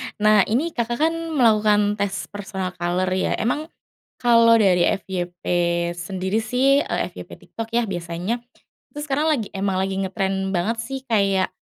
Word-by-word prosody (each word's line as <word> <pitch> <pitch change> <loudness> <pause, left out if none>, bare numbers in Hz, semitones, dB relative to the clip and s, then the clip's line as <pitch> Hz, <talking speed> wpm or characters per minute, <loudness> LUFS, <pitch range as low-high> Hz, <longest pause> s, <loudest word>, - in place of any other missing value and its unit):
nah 215 0 +4
ini 290 +10 0
Kakak 240 -2 -2
kan 315 +4 +2 0.2
melakukan 210 -4 +3
tes 200 -1 -2
personal 190 -2 -5
color 175 +2 0
ya 185 0 0
emang, 295 +8 -1 0.5
kalo 230 -1 +5
dari 190 -5 +3
FYP 180 -2 -3 0.5
sendiri 190 +4 -2
sih, 260 +5 +3
eee, - - -2
FYP - - -10
TikTok 225 0 -8
ya 240 - +3
biasanya, 175 +4 -3 0.5
itu 295 - -9
sekarang 295 +2 0
lagi 240 -9 0
emang 195 -1 -1
lagi 190 0 -1
ngetren 195 0 -2
banget 200 +6 0
sih 270 +3 -5
kayak, 195 -4 +2
205 Hz, 150 wpm, -22 LUFS, 190-235 Hz, 0.5 s, kalo